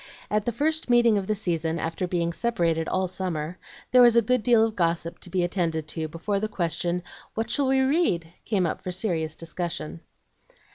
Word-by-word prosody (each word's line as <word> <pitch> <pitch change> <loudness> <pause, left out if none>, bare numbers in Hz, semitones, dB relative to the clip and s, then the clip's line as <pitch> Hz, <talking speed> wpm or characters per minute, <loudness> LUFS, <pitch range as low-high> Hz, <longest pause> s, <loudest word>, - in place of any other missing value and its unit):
At 210 0 +1
the 240 - +1
first 310 +5 0
meeting 235 -3 +5
of 190 - -6
the 215 - +1
season, 165 -5 -1
after 165 +3 -2
being 170 -1 -1
separated 170 -8 0
all 185 0 0
summer, 175 -2 -4 0.3
there 250 - +7
was 240 -1 +7
a 235 - +7
good 250 +2 +2
deal 225 0 +5
of 220 -1 -4
gossip 170 -1 -1
to 180 - -8
be 180 0 0
attended 165 -3 -1
to 160 0 -3
before 170 +6 -2
the 215 - -1
question, 175 -2 -1 0.3
"What 225 +1 -2
shall 280 -2 +2
we 265 0 +3
read?" 260 - +1
came 195 -5 +1
up 165 - -2
for 185 - -4
serious 170 -5 -1
discussion. 165 -1 -4
180 Hz, 195 wpm, -26 LUFS, 165-225 Hz, 0.3 s, there